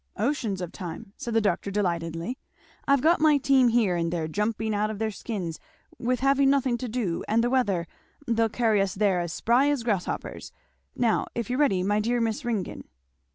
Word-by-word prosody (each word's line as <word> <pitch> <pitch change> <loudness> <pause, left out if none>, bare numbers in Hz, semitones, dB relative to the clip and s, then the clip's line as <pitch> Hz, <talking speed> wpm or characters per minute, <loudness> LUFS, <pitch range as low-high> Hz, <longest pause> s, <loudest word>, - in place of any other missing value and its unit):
"Oceans 220 -5 -1
of 175 - -5
time?" 185 +1 -8
said 235 -1 -5
the 225 - +4
doctor 200 -1 0
delightedly; 170 - -2 0.5
"I've 280 -1 +3
got 330 0 +4
my 305 -2 +5
team 265 -2 +4
here 225 -6 +2
and 170 -1 -1
they're 165 -2 -2
jumping 215 +5 -1
out 210 +1 0
of 215 - -5
their 220 +1 -1
skins 195 -6 -5 0.4
with 250 +1 0
having 275 0 +4
nothing 270 -3 +2
to 250 - -4
do 215 -8 -2
and 225 +2 +2
the 240 - 0
weather 200 -10 +1 0.4
they'll 230 -2 +1
carry 220 -3 +2
us 195 -1 -1
there 195 -3 +2
as 175 -1 -3
spry 250 - +2
as 285 -5 0
grasshoppers 205 -6 -3 0.4
now, 230 -3 +1
if 235 0 -3
you're 250 - -1
ready, 195 -11 +3
my 205 +2 +1
dear 240 +3 0
Miss 230 +4 -1
Ringgan!" 225 -6 -3
220 Hz, 195 wpm, -26 LUFS, 195-250 Hz, 0.5 s, my